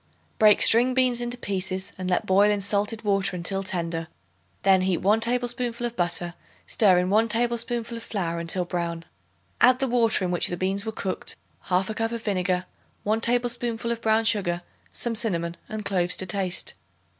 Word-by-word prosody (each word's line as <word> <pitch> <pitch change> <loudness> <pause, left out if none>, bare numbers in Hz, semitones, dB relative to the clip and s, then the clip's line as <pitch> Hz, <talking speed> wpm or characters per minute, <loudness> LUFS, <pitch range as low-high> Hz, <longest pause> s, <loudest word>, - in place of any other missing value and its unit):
Break 215 -1 +6
string 245 +3 +6
beans 250 -2 +2
into 240 +1 -3
pieces 190 -4 -2
and 185 0 -5
let 180 - 0
boil 200 +2 +4
in 205 -1 +1
salted 205 +3 0
water 195 -2 0
until 185 +3 -1
tender; 170 -3 -3 0.6
then 190 -1 +4
heat 185 -2 0
1 210 +3 +2
tablespoonful 240 0 -1
of 240 0 -4
butter; 175 -1 -1 0.3
stir 195 -5 +3
in 180 +1 0
1 220 +2 +3
tablespoonful 235 0 -1
of - - -8
flour 170 -7 -3
until 170 +2 -1
brown. 170 -1 -4 0.6
Add 250 +1 +6
the 270 +1 -1
water 230 -5 +2
in 180 - -2
which 175 - +3
the 175 - -4
beans 195 +4 -2
were - - -1
cooked, 195 -3 -2 0.3
1/2 190 +4 0
cup 225 +1 -2
of 230 -1 -5
vinegar, 185 -3 -1 0.4
1 215 +2 0
tablespoonful 240 -1 0
of 230 0 -4
brown 220 0 +2
sugar, 185 -6 +1 0.3
some 235 - -1
cinnamon 175 -7 -1
and 215 -1 -6
cloves 180 -2 +2
to 190 - -2
taste. 185 -1 -2
205 Hz, 180 wpm, -25 LUFS, 180-230 Hz, 0.6 s, Break